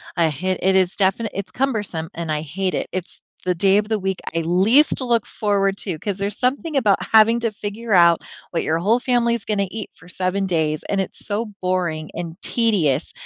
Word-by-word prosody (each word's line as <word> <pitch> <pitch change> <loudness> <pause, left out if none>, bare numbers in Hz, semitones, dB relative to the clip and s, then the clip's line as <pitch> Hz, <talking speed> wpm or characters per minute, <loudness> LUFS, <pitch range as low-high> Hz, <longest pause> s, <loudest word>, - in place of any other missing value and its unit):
I 170 -2 +3
hi 185 +5 -1
it 190 +1 +3
is 185 0 +2
definite 200 +3 +1
it's 200 0 -4
cumbersome, 210 -11 -2
and 165 -2 -4
I 150 0 -1
hate 185 +5 -3
it. - - -2
It's 185 -1 -5 0.2
the 180 -1 0
day 195 +3 +4
of 210 0 -4
the 220 - +1
week 190 -2 -2 0.2
I 165 - +1
least 195 - +3
look 235 -3 +1
forward 200 -2 0
to 185 -6 -4
'cause 200 +4 -4
there's 200 +1 -3
something 280 +4 0
about 210 -7 +3
having 225 +1 +5
to 230 -1 0
figure 210 +2 -6
out 170 -3 +6 0.3
what 170 - 0
your 160 - 0
whole 210 +8 +2
family's 235 -3 +1
gonna 200 -2 0
eat 215 -2 -6
for 170 - -17
7 185 +2 -1
days, 155 -4 0
and 195 -1 0
it's 190 - -7
so 210 +2 -1
boring 175 -4 -1
and 170 +1 -6
tedious. 175 - +1
195 Hz, 205 wpm, -21 LUFS, 175-220 Hz, 0.3 s, out